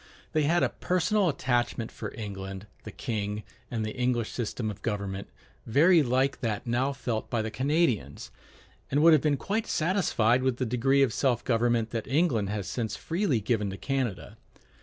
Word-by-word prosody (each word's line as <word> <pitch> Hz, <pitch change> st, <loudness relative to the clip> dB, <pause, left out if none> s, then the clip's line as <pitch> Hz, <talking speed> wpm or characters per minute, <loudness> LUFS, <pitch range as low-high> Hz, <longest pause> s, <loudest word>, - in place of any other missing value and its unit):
They 155 Hz, -2 st, +2 dB
had 170 Hz, +3 st, +3 dB
a -, -, +3 dB
personal 185 Hz, +2 st, +1 dB
attachment 120 Hz, -4 st, -1 dB
for -, -, -6 dB
England, 95 Hz, -2 st, -6 dB, 0.2 s
the 110 Hz, -, -6 dB
king, 105 Hz, -3 st, -3 dB, 0.3 s
and 110 Hz, -3 st, -2 dB
the 110 Hz, -, -5 dB
English 125 Hz, -2 st, 0 dB
system 115 Hz, -2 st, -3 dB
of 100 Hz, -, -11 dB
government, 100 Hz, -3 st, -3 dB, 0.4 s
very 160 Hz, +9 st, +5 dB
like 130 Hz, +1 st, +1 dB
that 110 Hz, -5 st, -2 dB
now 125 Hz, +3 st, +1 dB
felt 120 Hz, -5 st, -3 dB
by 115 Hz, -2 st, 0 dB
the 110 Hz, -, -4 dB
Canadians, 130 Hz, -, 0 dB, 0.6 s
and 145 Hz, +3 st, +2 dB
would 165 Hz, 0 st, +8 dB
have 155 Hz, -, +5 dB
been 150 Hz, -2 st, +2 dB
quite 215 Hz, -, -2 dB
satisfied 155 Hz, -, +2 dB
with 130 Hz, -2 st, 0 dB
the 130 Hz, -, -1 dB
degree 135 Hz, +4 st, +3 dB
of 125 Hz, -5 st, +1 dB
self 125 Hz, -4 st, +1 dB
government 115 Hz, -2 st, +1 dB
that 115 Hz, -2 st, -3 dB
England 130 Hz, -, +1 dB
has 105 Hz, -3 st, -3 dB
since 110 Hz, -4 st, -3 dB
freely 165 Hz, -, 0 dB
given 105 Hz, -1 st, 0 dB
to 95 Hz, -, -6 dB
Canada. 130 Hz, -7 st, -3 dB
120 Hz, 175 wpm, -28 LUFS, 110-140 Hz, 0.6 s, would